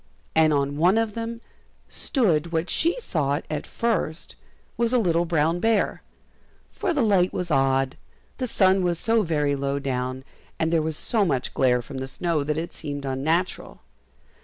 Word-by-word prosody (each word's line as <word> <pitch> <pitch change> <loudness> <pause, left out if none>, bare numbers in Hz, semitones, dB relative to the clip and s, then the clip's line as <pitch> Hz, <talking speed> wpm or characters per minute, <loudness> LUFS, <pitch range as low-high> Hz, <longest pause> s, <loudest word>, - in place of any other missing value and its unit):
And 160 -1 +4
on 140 -1 0
one 180 +7 +4
of 225 -2 0
them 230 +1 -5 0.5
stood 170 - 0
what 165 +1 -1
she 340 +8 +1
thought 145 - -1
at 150 -1 -3
first 215 -8 -2 0.4
was 235 +1 0
a - - +5
little 175 -6 +2
brown 165 0 +1
bear, 225 +1 +1 0.7
for 380 - -2
the 295 -7 +1
light 190 -4 +3
was 180 -2 -3
odd, 135 0 +2 0.4
the 255 - -1
sun 190 -3 +3
was 175 -2 +1
so 225 +5 +2
very 150 -6 0
low 140 0 -1
down, 130 -1 -3 0.3
and 160 +1 0
there 165 - +3
was 155 0 -2
so 220 -3 +1
much 135 -9 -1
glare 125 -2 +2
from 135 +2 -7
the 130 - -4
snow 160 +2 -1
that 150 +1 -2
it 165 +2 -4
seemed 145 -2 -5
unnatural. 160 +7 -1
160 Hz, 170 wpm, -24 LUFS, 140-200 Hz, 0.7 s, a